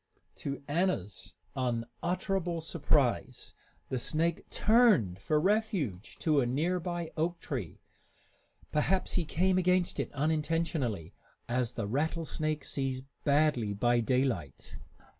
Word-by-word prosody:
To 140 0 -4
Anna's 145 - -1 0.2
unutterable 170 - -1
surprise, 145 -6 0 0.4
the 130 - -1
snake 160 +6 -1
turned 210 - +4
for 150 +9 +1
refuge 190 - 0
to 150 -3 +3
a 120 - +1
near 165 +9 +1
by 175 -1 -3
oak 170 +2 -1
tree. - - -5 0.9
Perhaps 185 +5 +1
he 175 - +1
came 185 +4 +2
against 180 0 +2
it - - -2
unintentionally, 150 - 0 0.3
as 125 0 0
the 115 - -2
rattlesnake 155 +4 -1
sees 130 -2 -2 0.2
badly 140 -7 +3
by 120 +3 +3
daylight. 125 - -1
150 Hz, 110 wpm, -31 LUFS, 125-175 Hz, 0.9 s, turned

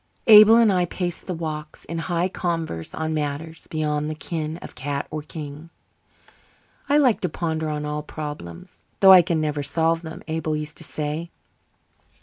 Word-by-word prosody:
Abel 215 0 +9
and 230 -3 +5
I 180 -1 +2
paced 175 -1 -4
the 180 - -2
walks, 155 -2 -6
in 165 +1 -4
high 175 +1 0
converse 165 - -3
on 160 0 -2
matters 155 +2 -4
beyond 150 -1 -1
the 155 - -4
ken 155 0 -4
of - - -10
cat 140 +2 -3
or 155 0 -3
king. 150 +1 -9 1.2
"I 290 - +5
liked 260 -7 +3
to 180 - 0
ponder 160 -1 -2
on 150 0 -3
all 150 0 -3
problems, 145 - -8 0.2
though 190 -1 +10
I 185 - +10
can 170 -2 -1
never 150 -1 -1
solve 165 +3 +1
them," 165 +1 -9
Abel 160 -1 -2
used 150 0 -6
to - - -4
say. 155 +3 -3
160 Hz, 170 wpm, -23 LUFS, 150-170 Hz, 1.2 s, though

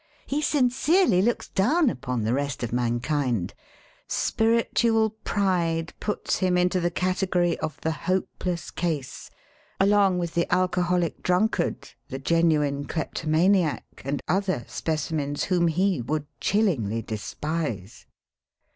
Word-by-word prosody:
He 285 +2 -1
sincerely 270 - +3
looks 235 +4 0
down 280 - +2
upon 125 - -2
the 110 +2 +1
rest 140 -1 -2
of 120 - -3
mankind. 120 - 0 0.5
Spiritual 225 -1 +2
pride 170 -5 0
puts 210 - -1
him 185 -1 +1
into 180 +1 +2
the 175 0 +1
category 180 -1 0
of 155 - -4
the 160 - 0
hopeless 180 0 -2
case 155 -7 -3 0.3
— - - -34
along 195 -1 +4
with 170 -2 -2
the 170 - 0
alcoholic 180 -2 +1
drunkard, 180 +5 0 0.2
the 135 - -4
genuine 150 -2 +1
klepto 160 0 -4
maniac, 170 +1 +1
and 140 +2 -3
other 185 - 0
specimens 145 +3 -2
whom 175 -3 +2
he 180 -1 +1
would 150 +5 -2
chil 210 +3 +2
lingly 115 - -1
despise. 115 - -4
170 Hz, 125 wpm, -25 LUFS, 145-190 Hz, 0.5 s, along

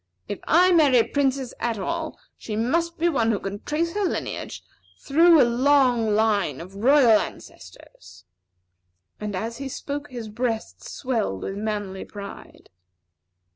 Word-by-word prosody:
If 205 - -5
I 360 +3 +5
marry 300 -7 +5
a 230 - +5
princess 270 -1 -1
at 235 -2 -1
all, 320 - -4 0.2
she 215 - -6
must 335 +10 0
be 335 - +1
one 250 -9 +1
who 220 - +1
can 200 +1 -5
trace 335 +3 -2
back 415 - -2
her 380 - +1
lineage - - -5 0.3
through 330 +3 +5
a - - +6
long 245 -3 +3
line 205 -10 +1
of 185 +3 -10
royal 240 -1 +5
ancestors." 90 0 -11 0.9
And 210 -2 -4
as 225 +5 -4
he 275 -1 -5
spoke, 285 +2 -5
his 240 -3 -7
breast 225 +1 -3
swelled 225 - -3
with - - -4
manly 205 -2 -4
pride. 200 - -11
240 Hz, 150 wpm, -24 LUFS, 210-290 Hz, 0.9 s, a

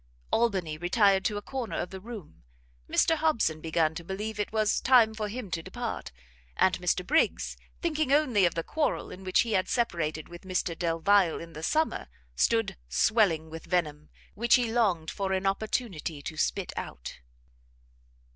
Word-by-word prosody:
Albany 190 -10 +1
retired 195 +2 +3
to 210 - 0
a 205 - -5
corner 255 -3 -4
of 175 - -3
the 190 - -7
room; 210 -6 -10 0.5
Mr 325 - +3
Hobson 230 - +1
began 160 0 +1
to 170 - -7
believe 210 +4 -5
it 210 - -1
was 215 -1 +1
time 240 -4 +5
for 215 -1 -3
him 220 -3 -6
to 165 - -1
depart; - - -5 0.5
and 185 -1 +4
Mr 180 0 0
Briggs 315 - +1 0.3
thinking 310 -4 0
only 255 -10 +4
of 170 - -4
the 165 - -1
quarrel 305 - -1
in 190 - -9
which 185 -1 +3
he 230 - -2
had 185 -3 +1
separated 165 -10 -1
with 175 0 -11
Mr 185 -2 -2
Delvile 170 +2 +2
in 165 0 -10
the 155 - -8
summer, 315 - 0 0.3
stood 225 - +1
swelling 165 - +2
with 165 0 -8
venom, 155 -4 -1 0.2
which 235 +3 +4
he 245 -3 +1
longed 185 -9 +1
for 195 -1 -2
an 190 0 -1
opportunity 195 - -2
to 155 - -5
spit 185 +4 -1
out. - - -7
190 Hz, 170 wpm, -28 LUFS, 165-225 Hz, 0.5 s, time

